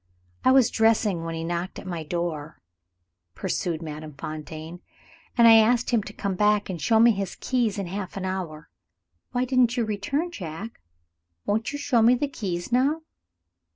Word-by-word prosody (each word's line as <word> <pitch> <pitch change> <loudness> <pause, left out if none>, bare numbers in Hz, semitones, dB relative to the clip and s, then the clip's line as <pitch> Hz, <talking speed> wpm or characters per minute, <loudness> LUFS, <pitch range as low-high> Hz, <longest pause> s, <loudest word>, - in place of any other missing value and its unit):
"I - - +5
was 260 -3 +5
dressing 215 -6 +2
when 165 0 -4
he 165 - -4
knocked 175 +2 -3
at - - -9
my 175 -3 -4
door," 160 -2 -4 0.8
pursued 170 -3 -2
Madame 155 -1 -7
Fontaine; 155 +3 -7 0.6
"and 235 -1 +7
I 225 -1 +9
asked 235 +3 +3
him 235 -3 +3
to - - -8
come 200 -1 -3
back, 210 +1 +2
and 170 -4 -6
show 225 -1 +3
me 235 +1 +7
his 195 -3 -3
keys 240 -6 0
in 200 - -2
half 190 +2 -5
an 190 - -3
hour. 180 -5 -5 0.6
Why 250 0 0
didn't 255 -1 +2
you 235 - +1
return, 220 - -2
Jack? 190 - -7 0.6
Won't 220 +4 0
you 290 - -4
show 285 -5 +2
me 235 +3 +6
the 285 +4 -1
keys 185 -9 -4
now?" 280 +6 +2
200 Hz, 175 wpm, -25 LUFS, 170-235 Hz, 0.8 s, I